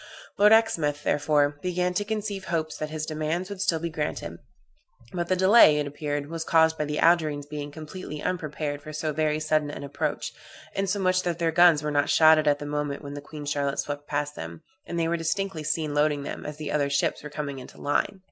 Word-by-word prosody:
Lord 210 +1 +5
Exmouth, 155 -10 +3
therefore, 145 0 +2
began 180 0 0
to 205 - 0
conceive 205 -2 -4
hopes 160 -2 -2
that 155 - -4
his 155 0 -4
demands 160 +5 -2
would 195 -2 -5
still 165 - +2
be 165 +1 -4
granted; 155 -2 -4 0.7
but 175 -1 -2
the 185 - +2
delay, 190 -4 +7
it 150 - 0
appeared, 145 0 -3
was 165 +1 -4
caused 160 -1 +4
by 150 - -2
the 150 0 -3
Algerines 155 -4 +3
being 145 0 -6
completely 155 +1 -8
unprepared 150 -4 -3
for 155 +1 -9
so 155 0 -2
very 155 0 0
sudden 155 -1 +1
an 145 - -7
approach, 140 0 -3 0.4
insomuch 190 -1 +1
that 175 -2 -2
their 165 -1 +1
guns 165 -2 +5
were 150 - -1
not 145 -1 +1
shotted 155 -1 +6
at 145 0 +4
the 145 - -7
moment 145 0 -3
when 140 0 -7
the 145 - -6
Queen 150 0 -9
Charlotte 140 -1 -1
swept 145 0 -4
past 145 0 -2
them, 80 0 -8 0.2
and 170 - -4
they 165 - +1
were 170 +1 0
distinctly 170 0 -2
seen 155 0 -1
loading 145 -1 +1
them 145 - -6
as 150 0 -6
the 155 -1 -5
other 145 -2 +1
ships 140 - 0
were 150 - -8
coming 145 -2 -5
into 125 - -12
line. 145 +6 0
155 Hz, 215 wpm, -26 LUFS, 145-170 Hz, 0.7 s, delay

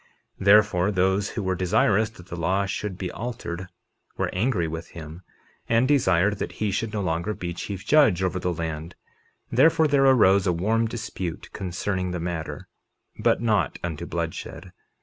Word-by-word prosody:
51:4 95 - -6
Therefore, 105 -2 +5
those 95 +1 +1
who 110 - -4
were 95 0 0
desirous 95 +4 +2
that 95 -5 -16
the - - -5
law 95 +4 0
should 100 0 -4
be 90 -2 -4
altered 105 -6 -5 0.5
were - - -1
angry 95 -4 +1
with 80 +1 -6
him, 80 +2 -9 0.5
and 115 +2 +3
desired 105 -7 +3
that - - -4
he 105 -2 -1
should 105 +3 -2
no 105 -2 -2
longer 85 +4 -1
be 85 -1 -4
chief 95 +2 -6
judge 135 - +4
over 95 0 0
the 90 0 -1
land; 80 0 -5 0.6
therefore 160 +6 +4
there 140 -2 +3
arose 100 -7 +5
a 90 - +3
warm 110 +7 +1
dispute 110 -7 -5
concerning 95 0 -2
the 90 0 -3
matter, 85 -2 -5 0.5
but - - +2
not 105 - +1
unto 85 -3 -4
bloodshed. - - -5
95 Hz, 170 wpm, -25 LUFS, 85-110 Hz, 0.6 s, Therefore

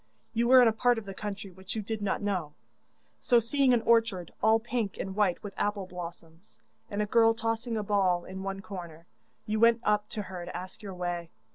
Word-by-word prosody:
You 235 +1 +1
were 255 0 +8
in - - +6
a - - +5
part 245 +2 +3
of 225 - -5
the 195 - -6
country 200 0 -6
which 190 +3 -7
you 215 - -2
did 220 +1 -4
not 205 0 -1
know, 180 -7 -2 0.6
so 240 - +4
seeing 260 +3 +2
an 235 -2 +3
orchard 225 -7 +2
all 220 +1 +5
pink 230 -3 -3
and 190 0 -4
white 200 -4 +1
with 205 -2 -6
apple 205 -2 -1
blossoms, 175 +1 -10 0.3
and 205 +1 -1
a - - -1
girl 225 +1 +4
tossing 225 +1 -2
a 215 - -1
ball 190 -4 +1
in 190 +1 -7
one 195 0 -4
corner, 170 -5 -8 0.4
you 215 0 -1
went 230 +1 +5
up 210 0 +1
to 210 - -4
her 185 -2 -7
to 175 - -6
ask 185 +4 -8
your 195 -3 -7
way. 175 -1 -3
205 Hz, 220 wpm, -29 LUFS, 185-225 Hz, 0.6 s, were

